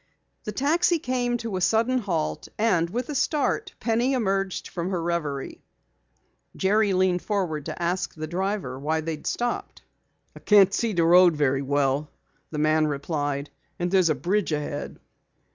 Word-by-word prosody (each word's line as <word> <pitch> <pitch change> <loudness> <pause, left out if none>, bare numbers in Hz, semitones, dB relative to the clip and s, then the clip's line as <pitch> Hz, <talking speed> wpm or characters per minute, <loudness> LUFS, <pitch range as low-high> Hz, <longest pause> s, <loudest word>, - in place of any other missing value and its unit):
The 210 - -3
taxi 330 - +2
came 245 -4 -1
to 225 -5 -4
a - - -3
sudden 225 +7 +2
halt 165 - -2
and 180 -7 +2
with 245 - -3
a - - -2
start 310 +8 0
Penny 240 +3 +1
emerged 195 -6 -1
from 170 +1 -4
her 185 -2 -1
reverie. 165 -5 -3 0.9
Jerry 205 +2 +2
leaned 185 -1 +2
forward 175 -8 -2
to - - -6
ask 175 +1 -1
the 155 0 -4
driver 180 -6 -3
why 160 +3 -1
they 165 +1 -3
had - - -9
stopped. 240 0 -3 0.5
"I - - -10
can't 200 -2 +5
see 230 0 0
the 170 -2 +2
road 175 0 +6
very 140 -2 +1
well," 140 +1 0 0.4
the 155 - -6
man 155 +1 +3
replied. 145 -1 -3 0.3
"And 175 0 -2
there's 185 -3 +4
a 155 - +2
bridge 180 +8 0
ahead." 145 -1 -4
180 Hz, 160 wpm, -25 LUFS, 155-220 Hz, 0.9 s, road